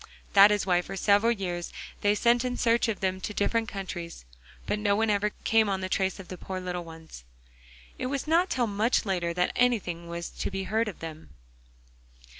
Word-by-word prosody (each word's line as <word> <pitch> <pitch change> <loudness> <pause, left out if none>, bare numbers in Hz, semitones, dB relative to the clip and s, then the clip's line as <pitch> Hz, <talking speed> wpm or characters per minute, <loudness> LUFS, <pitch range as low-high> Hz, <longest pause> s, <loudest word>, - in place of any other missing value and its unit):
That 200 +1 +9
is 210 -1 +1
why 180 -2 +3
for 195 +2 -7
several 205 +4 +4
years 180 -5 -3 0.3
they 205 0 +3
sent 240 +3 +3
in 250 0 -2
search 235 +1 +2
of 220 -3 -2
them 190 0 -1
to 210 - -5
different 225 +2 0
countries, 175 - -6 0.4
but 210 - -1
no 205 -1 +2
one 220 +1 +2
ever 205 +1 +1
came 220 -2 +3
on 190 -1 -1
the 185 - -3
trace 190 0 0
of 190 - -9
the 180 -1 -8
poor 190 -1 -5
little 180 -1 -4
ones. 160 - -12 0.8
It - - -2
was 275 0 -2
not 335 +4 +3
till 250 -2 +1
much 220 +3 +1
later 175 -4 -1
that 180 0 +1
anything 190 -9 0
was 170 0 -5
to - - -4
be 195 0 -3
heard 220 +4 0
of 205 - -7
them. 160 -1 -8
200 Hz, 205 wpm, -28 LUFS, 180-225 Hz, 0.8 s, That